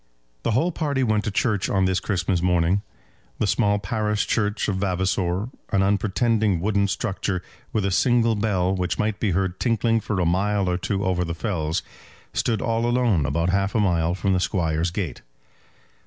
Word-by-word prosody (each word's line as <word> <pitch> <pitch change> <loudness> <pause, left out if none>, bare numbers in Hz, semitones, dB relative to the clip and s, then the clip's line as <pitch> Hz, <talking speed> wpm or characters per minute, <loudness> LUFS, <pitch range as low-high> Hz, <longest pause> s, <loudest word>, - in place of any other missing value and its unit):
The 115 - 0
whole 170 +6 +2
party 145 -5 -1
went 110 -2 +1
to - - 0
church 105 -1 0
on 95 -1 +2
this 95 0 +1
Christmas 90 -3 -1
morning. 90 +2 +2 0.6
The - - 0
small 105 -1 +2
parish 105 +1 -1
church 105 -1 0
of 100 -3 -1
Vavasor, 95 +1 0 0.2
an 95 -1 +3
unpretending 105 0 +1
wooden 100 +2 +1
structure, 95 -3 -2 0.3
with 105 -3 0
a 100 - 0
single 115 +2 +3
bell 100 -4 +1
which 90 -1 -1
might 105 -1 -1
be 110 - +1
heard 95 0 -1
tinkling 115 -1 +2
for 105 -3 -2
a 90 - +1
mile 100 +3 +1
or 90 0 0
two 100 +1 -2
over 90 -1 +1
the 85 -1 -3
fells, 80 -5 -2 0.5
stood 115 -4 0
all 115 0 0
alone 120 - +2
about 85 +3 0
half 100 +2 0
a - - +3
mile 85 -4 +1
from 95 0 0
the 90 - +2
Squire's 85 -3 0
gate. 85 - -4
100 Hz, 180 wpm, -24 LUFS, 90-110 Hz, 0.6 s, an